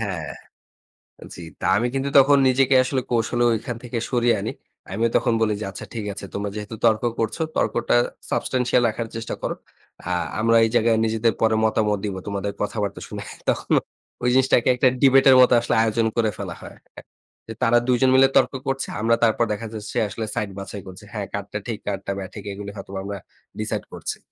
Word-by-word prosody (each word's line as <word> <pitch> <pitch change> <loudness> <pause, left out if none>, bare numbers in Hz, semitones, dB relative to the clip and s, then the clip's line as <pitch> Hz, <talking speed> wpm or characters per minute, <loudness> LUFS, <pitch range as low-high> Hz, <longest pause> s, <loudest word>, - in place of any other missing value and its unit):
হ্যাঁ, 90 -9 -4 1.0
জী। 85 - -9 0.2
তা - - -3
আমি 120 +3 +1
কিন্তু 135 +1 -1
তখন 140 +1 +5
নিজেকে 130 +1 +3
আসলে 130 0 -1
কৌশলে 120 +1 +1
ঐখান 115 +1 -3
থেকে 120 -1 -4
সরিয়ে 120 -1 +3
আনি। - - -3 0.4
আমিও 115 +4 +1
তখন 120 -3 +1
বলি 110 -1 +2
যে - - -3
"আচ্ছা - - -8
ঠিক 110 -3 -4
আছে। 100 - -8
তোমরা 100 0 -3
যেহেতু 105 +1 -6
তর্ক 110 0 +3 0.2
করছ, 115 +4 -1 0.2
তর্কটা - - +1 0.4
সাবস্ট্যানশিয়াল 125 -1 +1
রাখার 115 +1 -4
চেষ্টা 115 0 -4
করো। - - -2 0.5
আ - - -1 0.3
আমরা 115 0 +4
এই - - 0
জায়গায় 115 -1 +3
নিজেদের 110 0 +1
পরে 110 -1 +3
মতামত 105 -1 +1
দিব। 100 -2 -3
তোমাদের 100 0 -2
কথাবার্তা 105 -1 -2
শুনে" - - -7 0.3
তখন - - 0 0.5
ওই 125 - +3
জিনিসটাকে 130 -2 +3
একটা 130 +1 +3
ডিবেট 135 -1 +6
এর 130 - +8
মত 125 - +5
আসলে 120 - -1
আয়োজন 115 0 +1
করে 110 -2 +3
ফেলা - - -5
হয়। - - -11 0.7
যে 110 - -6
তারা 120 0 +4
দুজন 125 +1 +3
মিলে 135 0 +7
তর্ক - - +3
করছে। 135 0 -1
আমরা 115 +1 +3
তারপর 115 +1 +3
দেখা 115 +2 -5
যাচ্ছে 105 -1 -6
আসলে 110 +2 -5
সাইড 105 -2 -1
বাছাই 100 0 -7
করছি। 95 +3 -11
হ্যাঁ, 105 -3 -4
কার 100 -1 -3
টা 105 - -2
ঠিক 110 -3 -3
কার 100 -1 -1
টা - - 0
বেঠিক 100 +1 -8
এগুলো 100 0 -7
হয়তবা 95 0 -6
আমরা 100 0 -4 0.4
ডিসাইড - - -3
করছি। - - -5
115 Hz, 190 wpm, -23 LUFS, 105-120 Hz, 1.0 s, এর